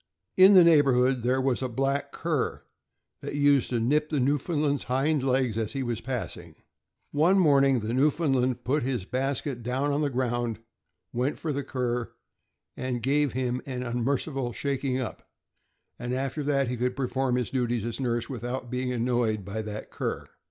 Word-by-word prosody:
In 190 +2 +8
the 180 - +9
neighborhood 135 -6 +4
there 125 +3 +1
was 130 -1 0
a 130 - -1
black 135 +3 -1
cur - - -2 0.6
that - - -5
used 145 -2 +3
to 120 - 0
nip 150 +6 +1
the 150 - 0
Newfoundland' 145 +2 +1
s - - -9
hind 135 +4 +1
legs 130 -4 +1
as 110 -2 -2
he 135 -1 -2
was 120 -2 -3
passing. 125 -1 -5 0.6
One 165 +7 +3
morning, 140 -7 +4
the 110 +2 -3
Newfoundland 130 -3 +1
put 135 +6 +1
his 125 -6 -2
basket 135 +1 -2
down 130 +5 -1
on 145 +1 0
the 145 - +1
ground, 120 -3 -1 0.6
went 125 +4 -1
for 155 -2 -3
the 140 +1 -2
cur, 125 -3 -2 0.9
gave 140 +3 +1
him 125 0 -1
an 125 -2 -4
unmerciful 125 +1 -1
shaking 135 -1 -1
up, 125 - -6 0.7
and 120 +1 -3
after 135 +3 -2
that 140 -2 +1
he 125 +1 -3
could 125 +1 -1
perform 130 -1 0
his 125 -3 -1
duties 120 -4 -1
as 120 +2 -4
nurse 120 -3 -1
without 125 0 -5
being 125 0 -1
annoyed 120 -4 0
by 105 +3 -4
that 105 0 -7
cur. - - -3
130 Hz, 170 wpm, -27 LUFS, 120-140 Hz, 0.9 s, the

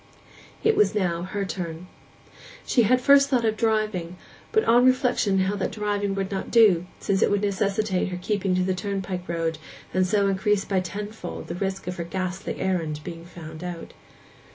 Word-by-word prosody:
It 445 0 +4
was 420 - +3
now 175 -4 0
her 195 +2 -3
turn. 175 -2 -5 0.8
She 240 - +3
at 255 +4 +4
first 280 +1 +5
had 255 -3 +3
thought 230 - +1
of 220 - +1
driving, 215 -6 -1 0.3
but 440 0 +3
on 240 +2 +5
reflection 255 -6 +3
held 190 +2 0
that - - -1
driving 205 -2 -1
would 195 0 -2
not 195 - -3
do, 195 -7 +5
since 195 -1 0
it - - +4
would 205 0 +1
necessitate 200 -1 0
her 180 -1 -4
keeping 195 -1 0
to 185 - +2
the 185 0 0
turnpike 185 -1 -4
road, 165 -2 -1 0.3
and 185 0 +2
so 200 +1 +2
increase 195 +1 +1
by 195 -2 +1
tenfold 205 +1 -6
the - - -2
risk 190 +2 -3
of 180 +1 -4
her 170 - -2
ghastly 185 +1 -4
errand 165 -5 -1
being 165 +1 -8
found 160 -1 -10
out. 175 -2 -6
195 Hz, 185 wpm, -25 LUFS, 180-210 Hz, 0.8 s, first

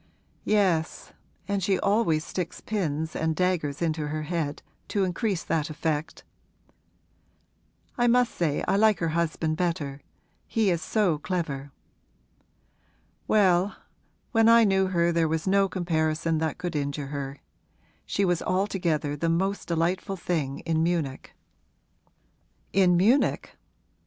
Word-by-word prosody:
'Yes, 185 -6 0 0.3
and 200 -1 -1
she 190 +1 +2
always 200 -7 +1
sticks 180 -3 -4
pins 160 -7 -2
and 160 0 0
daggers 170 -5 0
into 155 -2 -1
her 155 +1 -3
head, 155 -2 -3 0.2
to 200 -2 0
increase 190 0 -1
that 160 -1 -1
effect. 155 0 -3 1.8
I 240 - +4
must 245 0 +3
say 155 -4 -1
I - - +2
like 215 0 +4
her 165 - -1
husband 160 -1 -1
better: 160 -6 -2 0.5
he 220 -4 +1
is 170 -2 -1
so 185 -8 +1
clever.' 145 -6 -3 1.6
'Well, 190 -2 +3 0.6
when 225 -1 +4
I 230 0 +7
knew 190 -2 +3
her 170 -2 +2
there 165 -1 +2
was 160 0 -2
no 195 0 +3
comparison 160 -3 0
that 160 -1 -2
could 180 -2 -4
injure 145 -1 -3
her. 140 -1 -4 0.7
She 200 - +1
was 175 -2 +1
altogether 175 -6 0
the 165 +3 -1
most 190 +4 -1
delightful 175 +4 -1
thing 155 -6 -2
in 160 -1 0
Munich.' 160 -6 -2 1.4
'In 180 -2 +4
Munich?' 230 +10 +2
170 Hz, 125 wpm, -26 LUFS, 155-195 Hz, 1.8 s, I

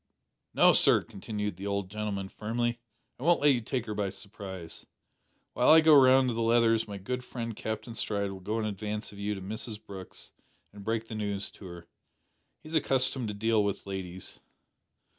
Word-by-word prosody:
"No, - - +7
sir," - - +4
continued 105 -1 -5
the 100 +2 -5
old 100 -1 -1
gentleman 105 -2 -3
firmly, 120 +4 -2 0.4
"I - - -7
won't 170 +2 +4
let 145 0 +5
you 120 - 0
take 125 +1 -3
her 105 - -4
by 100 -2 -1
surprise. 95 -4 -9 0.7
While - - +3
I 160 +1 +9
go 160 -1 +7
round 130 -1 +6
to - - -1
the 115 - -2
Leathers 115 -1 +3
my 100 -1 -6
good 125 +6 -4
friend 115 -3 -5
Captain 110 +2 -5
Stride 100 -3 -2
will 95 - -8
go 105 +4 -3
in 110 - -1
advance 105 +1 -4
of 100 - -12
you 105 +1 -2
to 95 - -7
Mrs 110 +2 -5
Brooke's 100 -4 -11 0.4
and 100 -1 -10
break 115 +1 -2
the - - -7
news 100 -2 -2
to 100 - -13
her. 85 -1 -10 0.8
He 155 - -10
is - - -9
accustomed 130 -5 +2
to 105 - -4
deal 110 0 +2
with 100 -1 -2
ladies." 95 -2 -6
105 Hz, 195 wpm, -29 LUFS, 100-115 Hz, 0.8 s, I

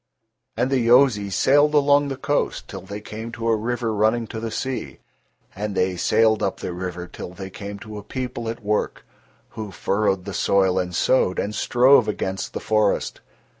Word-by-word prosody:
And 125 +3 0
the 135 - +3
Yozis 115 -5 +4
sailed 145 +2 +4
along 145 0 +4
the 135 -1 -4
coast 145 +2 -1
till - - -7
they 100 +3 -8
came 110 +2 -7
to 115 0 -4
a 115 - +4
river 115 +1 -2
running 110 +3 +2
to 110 - -4
the 115 0 -4
sea, 130 +3 -4 0.6
and 105 0 -4
they 90 0 +1
sailed 110 +5 +3
up 95 - -1
the 90 - -4
river 90 0 -5
till 90 0 -9
they 95 0 -7
came 100 +1 -7
to 105 +1 -8
a - - -11
people 125 0 -4
at 115 0 -6
work, 105 +1 -1 0.4
who 110 -2 -7
furrowed 95 0 0
the 100 - -5
soil 95 -1 +2
and 90 -1 -3
sowed, 95 -5 +2
and 105 - -2
strove 125 +1 +4
against 95 -2 -3
the - - -3
forest. 110 -2 0
110 Hz, 185 wpm, -23 LUFS, 100-120 Hz, 0.6 s, Yozis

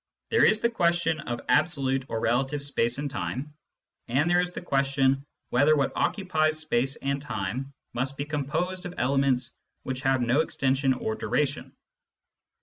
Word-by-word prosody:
There 450 - +4
is 215 0 +2
the 235 - +3
question 170 -5 +1
of 120 -4 -4
absolute 135 -5 +2
or 115 - -2
relative 135 +5 0
space 120 -4 +1
and 145 +1 -2
time, 140 +1 -4 0.5
and 135 +7 +2
there 175 +1 +4
is 180 - -1
the - - -6
question 135 -3 +1 0.3
whether 145 +5 +5
what 140 -2 +1
occupies 155 -6 +1
space 135 -4 0
and 140 0 -2
time 125 +1 -4 0.2
must 130 +3 -2
be 140 - -2
composed 165 +6 -2
of 180 - -9
elements 130 -2 +1 0.3
which 130 0 -4
have 130 -1 +2
no 120 +4 +2
extension 135 -3 +1
or 110 - -2
duration. 140 +5 -2
140 Hz, 155 wpm, -27 LUFS, 130-155 Hz, 0.5 s, whether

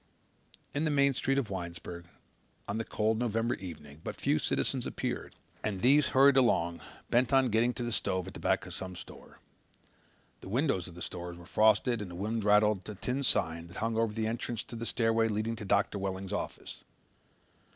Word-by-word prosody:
In 145 - 0
the 160 - +2
main 140 -1 +4
street 135 +2 0
of 125 -7 -1
Winesburg, 85 -1 -6 0.6
on 105 +2 -2
the - - -1
cold 110 0 0
November 115 0 0
evening, 75 -5 -9
but - - -4
few - - +1
citizens - - 0
appeared - - -4 0.3
and 100 -3 -2
these 140 +3 +6
hurried 135 +1 +6
along 85 -10 +3 0.3
bent 120 0 +3
on 135 -2 +4
getting 115 +3 +3
to 120 - -3
the 120 - -2
stove 95 -4 0
at - - -8
the - - -8
back - - +1
of - - -8
some 95 -1 -6
store. 85 - -11 1.0
The - - -10
windows 120 - +1
of 85 - -11
the 90 - -7
stores 85 -1 -6
were 85 - -12
frosted 110 +4 +3
and 100 - -5
the 90 - -8
wind 110 +4 -2
rattled 105 -1 +4
the 105 - -6
tin 125 +7 -2
sign 85 -9 0
that 85 - -11
hung 115 0 -1
over 115 -1 +2
the 110 +1 -2
entrance 115 0 -3
to - - -9
the 115 0 -4
stairway 115 -1 +2
leading 110 +1 -1
to 105 - -6
Doctor 100 +1 +1
Welling's 95 0 -3
office. - - -5
110 Hz, 195 wpm, -31 LUFS, 95-120 Hz, 1.0 s, these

